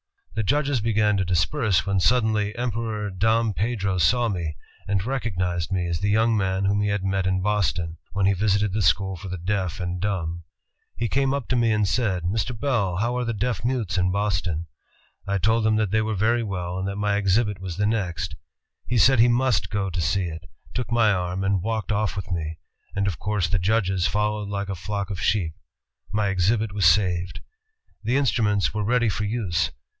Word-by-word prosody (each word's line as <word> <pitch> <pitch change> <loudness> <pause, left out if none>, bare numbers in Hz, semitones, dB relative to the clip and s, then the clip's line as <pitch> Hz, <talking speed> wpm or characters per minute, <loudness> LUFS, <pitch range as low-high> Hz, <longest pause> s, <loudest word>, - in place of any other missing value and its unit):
The 110 - -1
judges 140 +1 +1
began 105 -2 +2
to 95 - 0
disperse, 95 - +1
when 100 -1 +1
suddenly 110 -1 +2
Emperor 110 -3 -2
Dom 110 +3 +2
Pedro 100 -3 -1
saw 120 +8 +3
me, 85 -6 -3 0.3
and 100 -1 0
recognized 90 -9 -2
me 90 -2 0
as 85 -1 -1
the 100 - 0
young 110 +2 +3
man 95 -1 0
whom 100 +1 +2
he 105 - +1
had 100 -1 -1
met 95 -1 0
m 95 0 +1
Boston, 90 -5 0 0.2
when 100 -1 +1
he 100 - +4
visited 100 0 +1
the 110 - 0
school 95 +1 +2
for 95 +3 -8
the 95 0 -4
deaf 95 0 -2
and 90 0 -3
dumb. 85 -4 -2 0.5
He 115 - -1
came 135 +3 +1
up 140 -4 -4
to 130 - +2
me 115 -2 +3
and 105 -1 +2
said, 95 -3 0
'Mr. 110 +5 -2
Bell, 110 -10 0
how 120 +5 0
are 125 - -1
the 115 - -1
deaf 110 -1 -1
mutes 115 -8 0
in 90 0 +2
Boston?' 90 -5 -1 0.6
I 100 0 +1
told 110 +4 +2
him 110 - +3
they 110 0 +1
were 110 0 -1
very 115 +5 +2
well, 90 -4 -3
and 95 - -2
that 100 - -3
my 105 0 0
exhibit 105 +1 +1
was 95 -2 -6
the 105 - +1
next. 95 -7 -1 0.5
He 125 - 0
said 130 +2 +5
he 115 - +7
must 120 -7 +2
go 100 -2 -1
to 85 - -2
see 95 +5 +1
it, 80 -2 -7 0.2
took 125 -1 -3
my 115 -3 +4
arm 90 0 -1
and 95 -1 +1
walked 110 +2 -2
off 105 0 0
with 95 0 -5
me, 80 -2 -3 0.4
and 100 0 +1
of 95 -7 -2
course 105 -4 0
the 95 +3 0
judges 95 -1 +1
followed 105 +1 -1
like 100 -1 -3
a 95 - -2
flock 100 +2 -4
of 95 -1 -4
sheep. 95 -6 +1 0.6
My 105 -1 +1
exhibit 105 +4 +1
was 100 -3 +1
saved." 90 0 +2 0.6
The 120 +5 +1
instruments 105 - +1
were 105 -1 -1
ready 120 +1 +2
for 105 +1 -2
use. 105 -5 0
100 Hz, 205 wpm, -24 LUFS, 95-110 Hz, 0.6 s, he